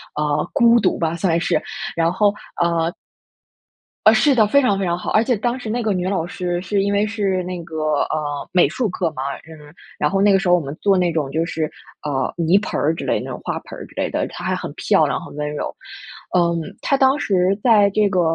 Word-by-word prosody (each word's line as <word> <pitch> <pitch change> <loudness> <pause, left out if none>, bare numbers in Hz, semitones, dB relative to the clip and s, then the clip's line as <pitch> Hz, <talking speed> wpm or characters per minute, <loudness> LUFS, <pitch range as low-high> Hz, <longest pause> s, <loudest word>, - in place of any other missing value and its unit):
呃， 150 0 -1
孤 235 -3 +5
独 190 - +1
吧， 165 0 0
算 170 -1 +1
是， - - 0 0.3
然 165 +1 +1
后， 205 +1 +3 0.3
呃 170 -1 +1 1.1
啊， 215 - +8
是 275 +6 +4
的， 220 -4 +4
非 280 +7 +4
常 200 -6 +1
非 190 - -1
常 175 0 0
好， - - -5
而 215 - +4
且 245 0 +1
当 240 +4 -2
时 225 - -6
那 240 +1 -1
个 215 - 0
女 180 0 -2
老 190 -4 -1
师 175 -1 -3
是 195 +2 0
因 200 +1 0
为 205 +1 +2
是 200 -4 -1
那 180 -1 -5
个， 165 -1 -10 0.3
呃， 145 -2 -3
美 180 -5 +5
术 220 +4 -1
课 175 -3 -2
嘛， 130 -3 -5
呃， 150 +1 -12 0.2
然 150 - +1
后 195 0 0
那 205 0 +5
个 195 - +4
时 195 - -2
候 180 - +6
我 - - +2
们 140 -1 -6
做 200 -2 +3
那 180 -2 +2
种 150 -4 -1
就 165 +2 0
是， 160 -2 -2 0.3
呃， 135 -3 -1
泥 170 +3 +3
盆 - - -3
儿 160 +3 +1
之 - - -6
类， - - +1
那 - - -7
种 - - -6
花 - - -3
盆 - - -9
儿 - - -8
之 - - -19
类 - - -1
的， - - -1
她 - - -9
还 - - 0
很 - - -6
漂 - - +3
亮 - - -1
很 - - -11
温 150 0 -3
柔。 150 - -4 0.6
嗯， 170 -1 +2 0.2
她 275 - +1
当 270 +2 +3
时 195 -1 +1
在 210 -5 +5
这 210 +1 +2
个， 185 -3 +1
180 Hz, 260 characters per minute, -20 LUFS, 165-210 Hz, 1.1 s, 啊